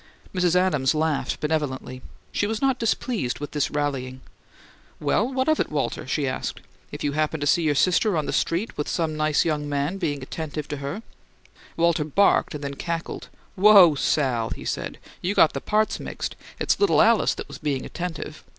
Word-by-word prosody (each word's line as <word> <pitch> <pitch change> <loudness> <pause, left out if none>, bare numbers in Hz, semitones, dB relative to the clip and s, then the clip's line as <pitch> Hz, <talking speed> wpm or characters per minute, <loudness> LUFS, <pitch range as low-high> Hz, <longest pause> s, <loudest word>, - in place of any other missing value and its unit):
Mrs. 180 -2 +2
Adams 155 -7 +2
laughed 155 -2 0
benevolently; 140 -5 -2 0.3
she 205 - 0
was 220 0 -2
not 270 -2 +1
displeased 225 - -1
with 145 - -6
this 150 -2 0
rallying. 135 -3 -3 0.8
"Well, 205 - +1
what 260 0 0
of 310 -1 +3
it, - - 0
Walter?" 145 -3 -2
she 140 +1 0
asked. 130 - -3 0.3
"If - - -6
you 145 - +1
happen 155 +1 -1
to 145 - -2
see 170 +4 +3
your 150 -3 +1
sister 185 +4 +3
on 155 - 0
the - - -3
street 175 +7 -1
when 150 - -3
some 160 -3 -1
nice 155 -1 +2
young 150 -3 -1
man 145 +3 -1
is 195 - -7
being 145 -6 -2
attentive 150 +1 -5
to 145 - -3
her 140 +10 -5 0.4
" - - -26
Walter 170 -2 +2
barked 155 +2 +2
and 145 - -6
then 140 0 -3
cackled. 165 +3 -5 0.2
"Whoa, 195 -4 +7
Sal!" 130 -5 0
he - - -7
said. - - -3 0.2
"You 190 +4 -1
got 160 - +5
the - - -4
parts 215 +1 +1
mixed. - - -5 0.2
It's - - +1
little 405 - +4
Alice - - +4
that - - -7
was - - -10
'being 140 -4 -2
attentive.' 165 -3 -6
155 Hz, 195 wpm, -24 LUFS, 145-180 Hz, 0.8 s, Whoa